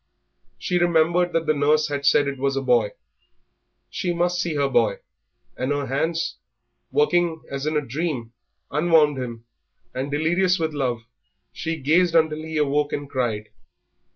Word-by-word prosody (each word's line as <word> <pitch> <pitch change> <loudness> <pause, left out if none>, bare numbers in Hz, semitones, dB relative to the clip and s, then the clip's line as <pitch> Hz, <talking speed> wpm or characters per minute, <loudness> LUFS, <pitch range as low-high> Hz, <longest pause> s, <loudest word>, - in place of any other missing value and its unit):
She 180 -2 -1
remembered 175 +1 +2
that 165 0 0
the 155 - +3
nurse 150 +1 +2
had 140 -1 -2
said 145 0 +4
it 140 -1 -4
was 135 0 0
a 135 - 0
boy. 120 -5 +2 1.0
She 175 -1 -2
must 175 +1 +1
see 170 -3 -2
her 140 -1 +2
boy, 115 -6 +2 0.6
and 130 +2 -2
her 145 -1 -1
hands, 160 +6 -1 0.5
working 175 - +1
as 140 +2 -3
in 155 0 +1
a 150 - -1
dream, 130 -4 -3 0.4
unwound 150 -2 +3
him, 120 -2 -6 0.5
and, 130 +2 -3
delirious 175 +5 +2
with 160 -2 -2
love, 125 -5 -1 0.5
she 165 -1 -3
gazed 165 +5 +3
until 155 -1 +2
he 160 0 -5
awoke 145 0 +1
and 145 0 -3
cried. 115 -5 -2
150 Hz, 155 wpm, -23 LUFS, 135-165 Hz, 1.0 s, said